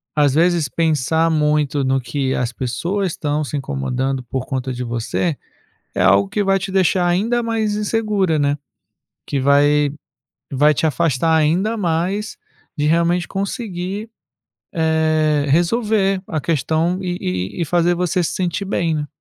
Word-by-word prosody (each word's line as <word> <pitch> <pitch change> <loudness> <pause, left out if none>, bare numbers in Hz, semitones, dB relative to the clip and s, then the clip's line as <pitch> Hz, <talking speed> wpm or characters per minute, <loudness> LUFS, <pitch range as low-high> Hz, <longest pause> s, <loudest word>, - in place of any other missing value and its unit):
às 145 -3 +3
vezes 170 -1 +2
pensar 160 +1 +1
muito 150 -2 +1
no 135 0 +1
que 130 +1 -2
as 125 -1 -1
pessoas 170 - -2
estão 150 0 -1
se 145 - -5
incomodando 130 - -2
por 130 +1 -4
conta 130 -1 -3
de 125 - -4
você, 120 +7 -2 0.6
é - - 0
algo 100 +1 +4
que 205 - 0
vai 195 0 +2
te 190 +1 -5
deixar 185 -1 +2
ainda 215 +8 +1
mais 220 -2 -1
insegura, 210 -5 0
né. 145 0 +1 0.7
Que 140 - -2
vai 145 +1 +3 0.6
vai 145 +3 +4
te 145 +5 +1
afastar 160 0 +1
ainda 175 +9 +1
mais 190 +3 -1 0.4
de 150 -1 0
realmente 170 +2 +2
conseguir, 195 0 -4 0.6
eh, 155 -3 +1
resolver 195 - +2
a 155 - -2
questão 160 +4 0
e 180 -1 -2
e 90 - -3
e - - +1
e - - +1
fazer 175 +2 +2
você 180 +1 0
se - - -2
sentir 180 +1 -2
bem, 170 -4 0
né. 150 -1 -2
160 Hz, 155 wpm, -19 LUFS, 140-185 Hz, 0.7 s, algo